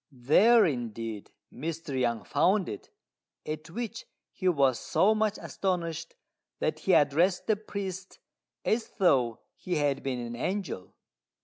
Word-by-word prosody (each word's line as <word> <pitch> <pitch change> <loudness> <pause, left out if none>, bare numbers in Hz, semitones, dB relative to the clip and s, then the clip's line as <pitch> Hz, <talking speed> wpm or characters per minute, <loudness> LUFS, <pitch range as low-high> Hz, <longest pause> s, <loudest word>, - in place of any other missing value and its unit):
There 185 - +5
indeed 115 - -3 0.2
Mr. 155 -1 -4
Yang 120 -4 0
found 190 - +2
it, 105 - -7 0.6
at 155 +1 -5
which 230 +4 -5 0.2
he 185 - -3
was 140 -8 +3
so 210 +3 +3
much 215 -1 0
astonished 170 -3 -3 0.4
that - - -1
he - - +1
addressed 170 +6 +3
the 220 - +3
priest 195 -3 -6 0.5
as 225 +1 0
though 130 - +3
he 180 - -3
had 145 -2 +1
been 135 -2 -2
an 120 0 -5
angel. 180 - -4
165 Hz, 130 wpm, -29 LUFS, 130-195 Hz, 0.6 s, There